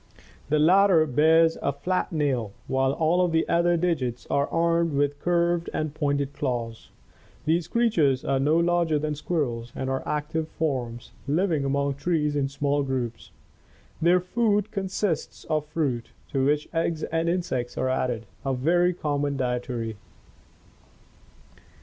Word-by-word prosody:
The 155 - +3
latter 175 +1 +5
bears 160 +4 +4
a 140 - +1
flat 180 +6 -2
nail, 135 - -1
while 135 0 +1
all 165 +4 +2
of 175 - +1
the 160 0 +1
other 170 0 +3
digits 145 -9 -1
are 140 0 +2
armed 170 -1 +1
with 145 0 0
curved 175 -1 +1
and 155 -2 -2
pointed 145 -2 -1
claws. 120 -5 -3 0.6
These 165 +2 +1
crea 235 +3 +2
tures 140 - +1
are 135 - +2
no 150 +4 +3
larger 170 -2 +2
than 150 0 -2
squirrels 130 -7 -2
and 130 0 -3
are 135 - -1
active 150 +1 -2
forms, 130 -8 -3 0.2
living 160 0 +1
among 140 +1 0
the 140 - -17
trees 150 -2 0
in 140 -2 0
small 140 +1 0
groups. 130 -4 -3 0.7
Their 175 +3 +5
food 210 +2 0
consists 190 -4 -2
of 155 -2 -1
fruit, 140 -7 -2 0.2
to 135 -1 0
which 150 +1 +1
eggs 165 -1 -1
and 165 +1 0
insects 170 -9 -2
are 130 - 0
added, 125 -3 -1 0.2
a 135 -2 0
very 175 +7 +2
common 145 -3 -1
dietary. 125 -3 -2
150 Hz, 150 wpm, -26 LUFS, 135-170 Hz, 0.7 s, latter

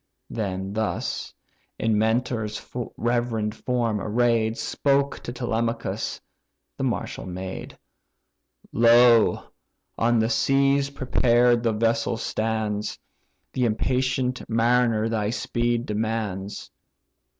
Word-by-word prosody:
Then 95 -2 -3
thus, 110 0 -2 0.5
in 110 -1 +1
Mentor's 110 -1 0 0.4
reverend 120 -3 0
form 115 -3 -1
array'd, 115 0 +1
Spoke 140 0 0
to - - -6
Telemachus 115 -1 -2 0.6
the - - -4
martial - - -3
maid. 95 +1 -6 0.9
"Lo! 115 0 +5 0.6
on 120 +1 +3
the 110 0 +2
seas, 135 +4 +2
prepared 120 -3 +3
the 115 -1 +1
vessel 115 +1 +1
stands, 110 -2 -2 0.6
The 125 - +1
impatient 125 +2 0
mariner 115 -1 +2
thy 110 -2 -1
speed 120 0 -1
demands." 105 -2 -3
115 Hz, 95 wpm, -25 LUFS, 110-120 Hz, 0.9 s, Lo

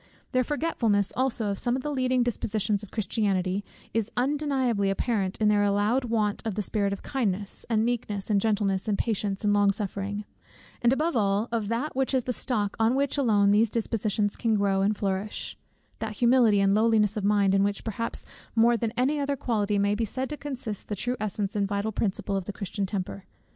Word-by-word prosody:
Their 255 0 +2
forgetfulness 235 - 0
also 245 -5 +1
of 200 - -3
some 240 0 +1
of 260 - -3
the 295 - -2
leading 255 -2 +1
dispositions 215 -3 -1
of 210 - -10
Christianity, 195 -2 -1 0.3
is 225 -1 0
undeniably 260 -6 +1
apparent 195 -1 -1
in 215 - +3
their 210 -1 +4
allowed 205 +6 +2
want 215 -3 0
of 220 -4 -3
the 210 - -1
spirit 200 -1 0
of 200 - -5
kindness, 205 -6 -2
and 220 -1 +2
meekness, 215 -4 -2
and 200 -1 +3
gentleness, 205 -2 0
and 205 -2 +1
patience, 205 -3 -1
and 205 0 +3
long 205 -1 +4
suffering; 205 +1 -4 0.6
and 240 - +4
above 305 +3 +1
all, 205 0 +1
of 225 -3 -1
that 240 +7 -2
which 265 0 +1
is 255 - +2
the 250 - -2
stock 210 -5 0
on 225 +3 +3
which 280 0 +1
alone 210 -8 +3
these 215 +2 +4
dispositions 215 -2 0
can 225 -2 +1
grow 200 -1 +2
and 205 +1 +1
flourish, 195 +1 -3 0.4
that 220 -1 -3
humility 235 -2 +4
and 195 0 +3
lowliness 215 -1 +3
of 210 - -3
mind, 200 -1 +3
in 195 - +4
which 200 0 -1
perhaps 230 +1 -3 0.3
more 235 +1 +5
than 230 0 -1
in 225 - -16
any 285 +4 +2
other 280 0 0
quality 210 -5 0
may 200 +1 +2
be 220 +2 -1
said 255 +5 -2
to - - -2
consist 260 -8 -5
the 205 - -3
true 245 +5 -2
essence 205 -1 -2
and 200 -1 +1
vital 200 +2 -1
principle 200 -1 -1
of 195 -2 -2
the 205 - -5
Christian 200 0 -3
temper. 190 0 -4
215 Hz, 205 wpm, -27 LUFS, 200-240 Hz, 0.6 s, more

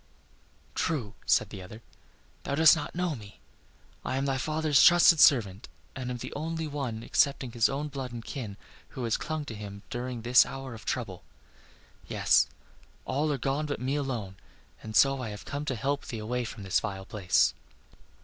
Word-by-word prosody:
"True," 125 -11 -2
said - - +3
the 95 - -7
other, 105 +5 -11 0.6
"thou 140 - -2
dost 160 +2 +7
not 155 0 -5
know 175 -3 -1
me. 105 -3 -12 0.6
I 130 - -2
am 135 - 0
thy 135 -1 0
father's 155 0 +3
trusted 175 -2 +7
servant, 105 -8 +4 0.3
and 130 -1 -4
am 125 - -3
the - - -7
only 160 +2 -3
one 135 -7 -4
excepting 135 -2 +1
his 115 -1 +3
own 145 +2 -2
blood 135 -3 -6
and 115 -1 -7
kin 110 -9 -6 0.4
who 130 - -3
has 115 -2 +1
clung 155 -2 -3
to 120 - -6
him 100 -1 -8
in 125 -1 -4
this 120 +1 +7
hour 135 -2 -7
of 110 - -11
trouble. - - -3 0.8
Yes, - - +3 0.6
all 150 +3 0
are 140 - 0
gone 140 +4 -1
but 145 - -3
me 130 +3 -1
alone, 120 -10 -3 0.4
and 110 0 -7
so 135 +4 +4
I 115 - -4
have 105 0 -8
come 145 +1 -4
to 130 - -1
help 140 +5 -2
thee 115 - -5
away 120 +3 -2
from 105 - -8
this 95 - +2
vile 95 -2 -5
place." 95 -4 +2
130 Hz, 185 wpm, -29 LUFS, 110-145 Hz, 0.8 s, dost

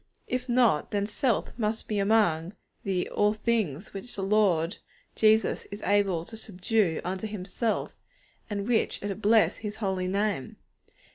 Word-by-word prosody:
If 250 0 -3
not, 235 -11 +3
then 205 -1 0
self 225 +2 -1
must 220 0 -1
be 210 -2 -1
among 195 -5 +2 0.3
the 190 -3 -1
'all 210 0 +2
things' 215 - -1
which 200 +5 -8
the 195 - -3
Lord 195 -4 +2 0.4
Jesus 220 0 +3
Christ - - -13
is 205 - -7
able 195 -5 +2
to 225 - -11
subdue 205 -3 0
unto 185 +4 -3
Himself, 210 +2 -2 0.6
and 200 -1 -3
which 235 -4 0
are 205 - -2
to 195 - -2
'bless 215 +2 +3
His 210 -1 -5
Holy 190 -4 -1
Name.' 200 -6 -1
205 Hz, 155 wpm, -28 LUFS, 190-220 Hz, 0.6 s, not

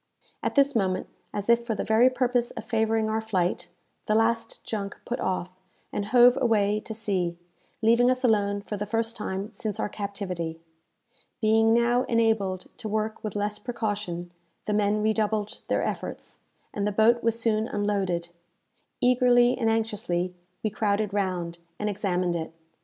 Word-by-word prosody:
At - - -2
this 280 -1 +4
moment, 190 -4 +1 0.3
as 205 -1 -4
if 235 0 +4
for 230 -2 -2
the - - -2
very 225 +3 +5
purpose 250 -2 +1
of - - -8
favouring 220 -1 +1
our 220 0 0
flight, 180 -5 -1 0.4
the 215 - +2
last 225 +1 0
junk 200 -3 -4
put 245 - -3
off, 185 -1 -2 0.4
and 205 - -1
hove 245 +3 +6
away 210 -3 +2
to 220 - -5
sea, 185 -6 -1 0.5
leaving 235 +2 +5
us 255 0 +1
alone 205 -4 +2
for 210 - -5
the 210 +1 -4
first 225 +2 -1
time 195 0 -4
since 215 -5 -4
our - - -1
captivity. 185 -6 -4 0.8
Being 225 0 +4
now 235 +2 +3
enabled 220 -5 +1 0.2
to 220 -3 -4
work 215 +1 -2
with 215 -2 -4
less 210 0 -2
precaution, 205 -7 -3 0.3
the 210 - -1
men 210 0 +2
redoubled 215 -1 0
their - - +1
efforts, - - -5 0.3
and 205 0 -1
the - - +1
boat 225 +3 +4
was 230 0 +1
soon 220 -1 +1
unloaded. 195 -5 -1 0.7
Eagerly 245 -1 +5
and 225 -3 +1
anxiously 205 -5 -1 0.3
we 215 - 0
crowded 205 -1 0
round, 180 -4 -2 0.2
and 210 - -2
examined 180 -3 0
it. 160 -1 -3
215 Hz, 160 wpm, -26 LUFS, 200-230 Hz, 0.8 s, hove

